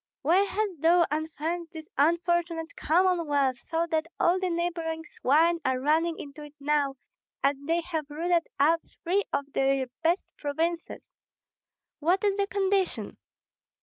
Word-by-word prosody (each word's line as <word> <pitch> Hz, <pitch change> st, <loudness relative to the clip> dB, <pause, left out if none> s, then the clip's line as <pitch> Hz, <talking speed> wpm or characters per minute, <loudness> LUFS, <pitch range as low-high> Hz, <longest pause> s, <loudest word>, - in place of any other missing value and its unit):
why 330 Hz, +6 st, +4 dB
hast 405 Hz, +1 st, 0 dB
thou 340 Hz, +1 st, +5 dB
unfenced 320 Hz, +2 st, -3 dB
this 315 Hz, -1 st, -8 dB
unfortunate 335 Hz, +2 st, +1 dB
Commonwealth, 310 Hz, -7 st, +2 dB
so 330 Hz, +5 st, -1 dB
that 320 Hz, 0 st, +1 dB
all 355 Hz, +2 st, +3 dB
the 370 Hz, -1 st, -1 dB
neighboring 335 Hz, -1 st, -2 dB
swine 335 Hz, +2 st, +2 dB
are 260 Hz, -1 st, +1 dB
running 320 Hz, +4 st, +1 dB
into 285 Hz, +1 st, -9 dB
it 295 Hz, 0 st, -12 dB
now, 285 Hz, -1 st, +1 dB, 0.5 s
and 280 Hz, +1 st, 0 dB
they 335 Hz, +1 st, +2 dB
have 320 Hz, -4 st, -4 dB
rooted 335 Hz, +3 st, 0 dB
up 325 Hz, +4 st, +4 dB, 0.2 s
three 370 Hz, +4 st, +2 dB
of 280 Hz, -, -1 dB
the 270 Hz, -1 st, +1 dB
best 335 Hz, +4 st, +2 dB
provinces? 330 Hz, +4 st, -2 dB, 1.0 s
What 355 Hz, +6 st, +2 dB
is 405 Hz, -1 st, +2 dB
the 400 Hz, 0 st, 0 dB
condition? 390 Hz, -1 st, 0 dB
330 Hz, 140 wpm, -28 LUFS, 295-345 Hz, 1.0 s, thou